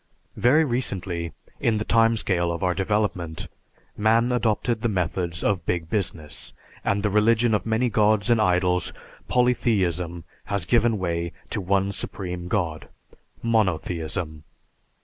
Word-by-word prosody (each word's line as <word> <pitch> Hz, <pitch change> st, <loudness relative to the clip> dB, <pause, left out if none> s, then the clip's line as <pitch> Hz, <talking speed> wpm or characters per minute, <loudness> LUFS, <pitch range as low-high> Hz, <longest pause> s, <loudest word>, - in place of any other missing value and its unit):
Very 150 Hz, +6 st, +4 dB
recently, 95 Hz, -, -2 dB, 0.3 s
in 110 Hz, -2 st, +2 dB
the 105 Hz, -, -2 dB
time 115 Hz, 0 st, +4 dB
scale 85 Hz, -5 st, +1 dB
of 85 Hz, +1 st, -4 dB
our 90 Hz, -1 st, +2 dB
development, 95 Hz, -4 st, -1 dB, 0.5 s
man 115 Hz, +3 st, +3 dB
adopted 115 Hz, -1 st, 0 dB
the 115 Hz, -, +1 dB
methods 90 Hz, -2 st, -1 dB
of 95 Hz, -4 st, +1 dB
"Big 85 Hz, -2 st, -2 dB
Business," 85 Hz, -7 st, -3 dB, 0.3 s
and 100 Hz, 0 st, 0 dB
the 105 Hz, -, +2 dB
religion 110 Hz, +2 st, +3 dB
of 105 Hz, -, 0 dB
many 110 Hz, +3 st, +2 dB
gods 110 Hz, 0 st, +2 dB
and 115 Hz, -2 st, +4 dB
idols, 90 Hz, -2 st, +1 dB, 0.3 s
polytheism, 95 Hz, -9 st, +1 dB, 0.2 s
has 100 Hz, -4 st, -2 dB
given 115 Hz, 0 st, +3 dB
way 85 Hz, -2 st, -2 dB, 0.2 s
to 105 Hz, -, -1 dB
one 95 Hz, +1 st, +1 dB
Supreme 90 Hz, -3 st, -5 dB
God, 85 Hz, -5 st, -2 dB, 0.6 s
monotheism. 85 Hz, -7 st, -1 dB
100 Hz, 130 wpm, -24 LUFS, 85-110 Hz, 0.6 s, Very